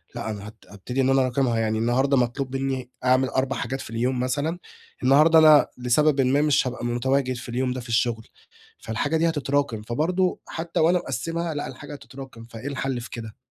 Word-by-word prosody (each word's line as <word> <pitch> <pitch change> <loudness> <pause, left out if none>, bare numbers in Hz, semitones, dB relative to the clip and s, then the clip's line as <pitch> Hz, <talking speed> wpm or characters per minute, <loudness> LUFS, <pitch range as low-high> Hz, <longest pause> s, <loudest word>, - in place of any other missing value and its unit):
لأ، 110 - -4
أنا 105 -1 -6
هت 105 - -11
هابتدي 115 +6 -3
إن 130 - +2
أنا 135 0 +4
أراكمها، 125 -2 +1
يعني 110 -1 0
النهارده 130 +4 +2
مطلوب 130 +2 -1
مني 135 -2 -2 0.2
أعمل 130 +1 +3
4 130 +1 -1
حاجات 135 +2 -3
في - - -9
اليوم 125 +3 -1
مثلًا، 145 +7 -1 0.4
النهارده 155 +5 +6
أنا 155 -2 +7
لسببٍ 135 +4 +2
ما 135 +2 +2
مش 150 -3 +2
هابقى 125 -1 -5
متواجد 130 +2 0
في 120 +1 -8
اليوم 125 +1 -1
ده 130 - -5
في 120 - -12
الشغل، 115 -1 0 0.5
فالحاجة 145 +8 -1
دي 165 +1 +2
هتتراكم، 145 -6 -1
فبرضه 165 - 0
حتّى 165 +1 -4
وأنا 170 +3 +4
مقسّمها 165 +3 -3
لأ، 145 - -4
الحاجة 145 - -9
هتتراكم، 135 -4 -11
فإيه 115 +2 -9
الحل 135 -3 -3
في 120 - -9
كده؟ 110 -2 -8
130 Hz, 190 wpm, -24 LUFS, 120-145 Hz, 0.5 s, أنا